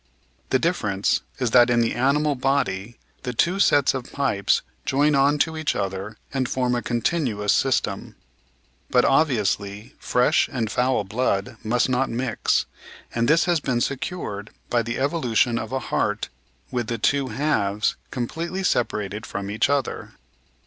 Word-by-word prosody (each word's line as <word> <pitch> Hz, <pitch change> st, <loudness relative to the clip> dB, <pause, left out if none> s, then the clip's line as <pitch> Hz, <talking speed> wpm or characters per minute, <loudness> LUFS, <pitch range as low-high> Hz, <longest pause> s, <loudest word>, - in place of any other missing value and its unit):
The 130 Hz, -, +3 dB
difference 110 Hz, -, 0 dB, 0.2 s
is 125 Hz, -3 st, -1 dB
that 120 Hz, 0 st, +6 dB
in 120 Hz, -1 st, +3 dB
the 115 Hz, -, +1 dB
animal 140 Hz, +4 st, +2 dB
body 125 Hz, -6 st, -1 dB, 0.2 s
the 125 Hz, -1 st, -4 dB
two 175 Hz, +11 st, +1 dB
sets 145 Hz, -7 st, +4 dB
of 130 Hz, -2 st, -5 dB
pipes 130 Hz, -9 st, +1 dB, 0.2 s
join 145 Hz, +3 st, +2 dB
on 140 Hz, +1 st, +4 dB
to 160 Hz, +2 st, +1 dB
each 155 Hz, -1 st, -1 dB
other 100 Hz, +2 st, -4 dB, 0.2 s
and 130 Hz, -2 st, -1 dB
form 125 Hz, -1 st, 0 dB
a 120 Hz, -, 0 dB
continuous 120 Hz, -, 0 dB
system. 135 Hz, -1 st, 0 dB, 0.7 s
But, 125 Hz, -, +4 dB
obvi 135 Hz, -2 st, +3 dB
ously, 100 Hz, +1 st, -3 dB
fresh 125 Hz, 0 st, +2 dB
and 115 Hz, -5 st, -2 dB
foul 125 Hz, -3 st, +1 dB
blood 110 Hz, +1 st, -1 dB
must 120 Hz, +3 st, +1 dB
not 130 Hz, +1 st, +1 dB
mix, 120 Hz, -1 st, 0 dB, 0.5 s
and 115 Hz, 0 st, +1 dB
this 165 Hz, +2 st, +4 dB
has 175 Hz, -2 st, +2 dB
been 125 Hz, -4 st, -1 dB
secured 120 Hz, -, -3 dB, 0.2 s
by 120 Hz, -, +3 dB
the 115 Hz, +1 st, -3 dB
evolution 125 Hz, -5 st, +1 dB
of 110 Hz, +2 st, -6 dB
a 130 Hz, -, 0 dB, 0.2 s
heart 105 Hz, 0 st, 0 dB, 0.4 s
with 120 Hz, -2 st, -2 dB
the 115 Hz, -, -2 dB
two 140 Hz, +4 st, +1 dB
halves 105 Hz, -8 st, 0 dB
com 120 Hz, -2 st, -3 dB
pletely 170 Hz, +6 st, -4 dB
separated 105 Hz, -, -1 dB
from 100 Hz, 0 st, -4 dB
each 110 Hz, +5 st, +1 dB
other. 140 Hz, -3 st, -1 dB
125 Hz, 155 wpm, -23 LUFS, 110-140 Hz, 0.7 s, that